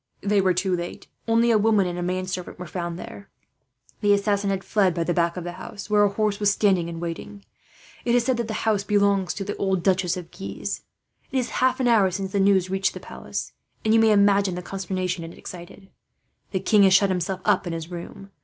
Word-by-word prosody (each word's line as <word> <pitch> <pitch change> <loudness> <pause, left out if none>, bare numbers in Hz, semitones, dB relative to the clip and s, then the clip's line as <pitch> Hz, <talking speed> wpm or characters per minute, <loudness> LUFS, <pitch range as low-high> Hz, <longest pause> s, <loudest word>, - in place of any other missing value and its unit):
"They 205 0 +2
were 185 -2 +2
too 185 0 +1
late. 175 0 -6 0.2
Only 230 +1 +3
a 220 - +4
woman 210 -2 +3
and 175 0 -3
a - - -2
manservant 185 0 -3
were 180 - -7
found 170 0 -4
there. 200 +2 -10 0.7
The 205 -1 +4
assassin 200 0 +1
had 195 -1 -1
fled 195 -5 +2
by 170 - 0
the 175 - 0
back 170 +1 +1
of 180 - -4
the 175 - -5
house, 200 +3 -9
where 210 0 +5
a 205 - +4
horse 210 0 -1
was 205 -1 +3
standing 190 -4 +2
in 165 -1 -6
waiting. 175 +4 -6 0.6
It 240 0 +2
is 245 - +3
said 255 0 +1
that 235 -2 -2
the 220 - -4
house 210 -3 +2
belongs 200 -2 +2
to 200 - -4
the 205 +1 -4
old 190 -3 0
Duchess 185 -2 +1
of 175 -2 -8
Guise. 100 - -5 0.5
"It 270 - -1
is 250 - 0
half 255 +1 +3
an 255 - +1
hour 215 -5 +4
since 190 +1 -4
the 200 - 0
news 195 -2 +4
reached 190 0 -1
the - - -6
palace, - - -6 0.3
and 220 - +3
you 225 - +6
may 225 -1 +5
imagine 200 -2 +4
the 180 - -5
consternation 185 -2 -3
it 165 +1 -9
excited. 180 +2 -10 0.6
The 190 -3 -2
king 210 +1 +4
has 190 -1 +6
shut 200 0 +4
himself 185 +1 -2
up - - +2
in 170 - -3
his 165 +1 -6
room. 195 +3 -8
195 Hz, 230 wpm, -24 LUFS, 180-205 Hz, 0.7 s, you